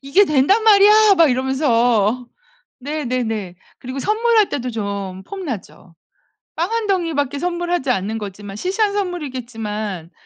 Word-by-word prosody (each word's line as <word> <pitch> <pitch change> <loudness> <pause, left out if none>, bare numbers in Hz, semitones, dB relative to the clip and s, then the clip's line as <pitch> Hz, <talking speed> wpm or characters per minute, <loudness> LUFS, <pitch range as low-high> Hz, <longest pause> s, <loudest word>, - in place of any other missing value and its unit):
'이게 275 +9 +4
된단 305 +7 +3
말이야!' 425 0 +6
막 330 -4 +5
이러면서. 245 -3 +1 0.5
네네네. 245 - -3 0.2
그리고 255 +2 -7
선물할 435 - +2
때도 250 -2 -3
좀 200 -4 -5
폼나죠. 260 - -8 0.6
빵 340 +6 -2
1 460 -1 -1
덩이밖에 315 -8 -1
선물하지 350 -3 -2
않는 220 -1 -1
거지만 200 -1 -8
시시한 400 - 0
선물이겠지만 230 - -4
265 Hz, 295 characters per minute, -19 LUFS, 220-365 Hz, 0.6 s, 말이야